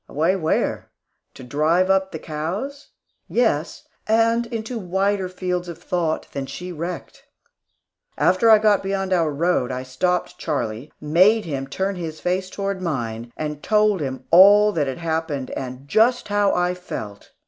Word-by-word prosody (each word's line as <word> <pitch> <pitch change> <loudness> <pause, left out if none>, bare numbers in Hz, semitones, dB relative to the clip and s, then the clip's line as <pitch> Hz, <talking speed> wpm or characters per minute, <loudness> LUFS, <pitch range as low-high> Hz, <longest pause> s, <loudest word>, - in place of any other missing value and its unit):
Away 165 +6 +1
where? 160 -4 -1 0.5
To - - -11
drive 160 +8 +2
up 190 0 +1
the 160 - -5
cows? 185 - -5 0.4
Yes, 195 -11 0 0.2
and 230 +1 +2
into 230 0 -4
wider 190 0 0
fields 180 -1 -3
of 170 - -7
thought 170 -2 -2
than 140 -1 -4
she 180 +5 -7
recked. 170 +2 -6 1.0
After 185 +5 +3
I 220 - +9
got 210 -1 +3
beyond 195 -1 -1
our 165 -3 +2
road, 150 -3 0
I 130 0 -4
stopped 180 +8 -1
Charlie, 130 -4 -3
and 150 0 -7
made 210 +6 +5
him 135 -4 -4
turn 190 +6 -2
his 160 -3 -6
face 185 +1 -1
toward 195 -1 -3
mine, 120 -8 -3
and 150 -1 -4
told 210 -4 +2
him 130 -2 -4
all 205 +4 +8
that 155 -7 0
had 135 - -3
happened, 160 -5 -3
and 130 +1 -6
just 225 - +2
how 205 -1 +2
I 180 0 +1
felt. 105 - -8
180 Hz, 160 wpm, -22 LUFS, 150-200 Hz, 1.0 s, I